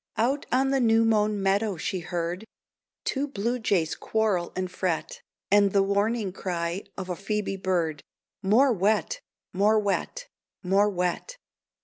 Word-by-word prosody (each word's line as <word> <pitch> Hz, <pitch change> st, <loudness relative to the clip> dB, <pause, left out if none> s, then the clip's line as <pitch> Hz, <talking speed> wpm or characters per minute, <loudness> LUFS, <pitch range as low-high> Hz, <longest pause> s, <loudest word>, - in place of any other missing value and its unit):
Out 265 Hz, +6 st, 0 dB
on 265 Hz, +2 st, +2 dB
the 270 Hz, -, +2 dB
new 225 Hz, -2 st, +4 dB
mown 210 Hz, -2 st, +2 dB
meadow 200 Hz, 0 st, +1 dB
she 185 Hz, +4 st, -2 dB
heard 175 Hz, +2 st, -3 dB, 0.6 s
Two 280 Hz, +1 st, -1 dB
blue 240 Hz, -1 st, -2 dB
jays 180 Hz, -8 st, +1 dB
quarrel 210 Hz, -6 st, 0 dB
and 185 Hz, -1 st, -3 dB
fret, 180 Hz, -3 st, -2 dB, 0.3 s
And 200 Hz, -1 st, +5 dB
the 200 Hz, -1 st, +4 dB
warning 200 Hz, +1 st, 0 dB
cry 175 Hz, 0 st, -3 dB
of 190 Hz, -2 st, -5 dB
a 180 Hz, -, -3 dB
Phoebe 200 Hz, +1 st, -2 dB
bird 170 Hz, -6 st, -1 dB, 0.4 s
"More 235 Hz, +7 st, +4 dB
wet, 215 Hz, -, 0 dB, 0.3 s
more 205 Hz, +4 st, +3 dB
wet, 210 Hz, -, -2 dB, 0.4 s
more 195 Hz, +3 st, +3 dB
wet." 180 Hz, -, -2 dB
200 Hz, 140 wpm, -26 LUFS, 185-225 Hz, 0.6 s, And